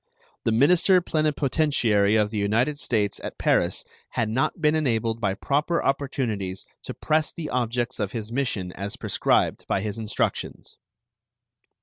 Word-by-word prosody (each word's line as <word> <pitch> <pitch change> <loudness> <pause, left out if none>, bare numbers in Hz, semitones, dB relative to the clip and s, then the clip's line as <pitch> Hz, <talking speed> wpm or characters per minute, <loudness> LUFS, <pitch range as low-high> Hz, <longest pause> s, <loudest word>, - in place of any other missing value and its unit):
The 115 - +2
minister 175 - +5
plenipotentiary 145 - +1
of 105 -1 +2
the 110 - -2
United 115 +8 +1
States 105 -7 0
at - - -6
Paris - - +1 0.2
had 110 -2 -1
not 130 +9 0
been 150 -1 +3
enabled 115 -7 0
by 100 -3 0
proper 150 +9 0
opportunities 120 -9 -2 0.2
to - - -6
press 155 0 +1
the 165 -3 -6
objects 120 -1 -1
of 100 -2 -1
his 110 -2 -5
mission 120 -8 -2
as 100 +2 -5
prescribed - - +1
by 95 - 0
his 105 +1 -4
instructions. 110 -1 -3
115 Hz, 140 wpm, -25 LUFS, 105-145 Hz, 0.2 s, minister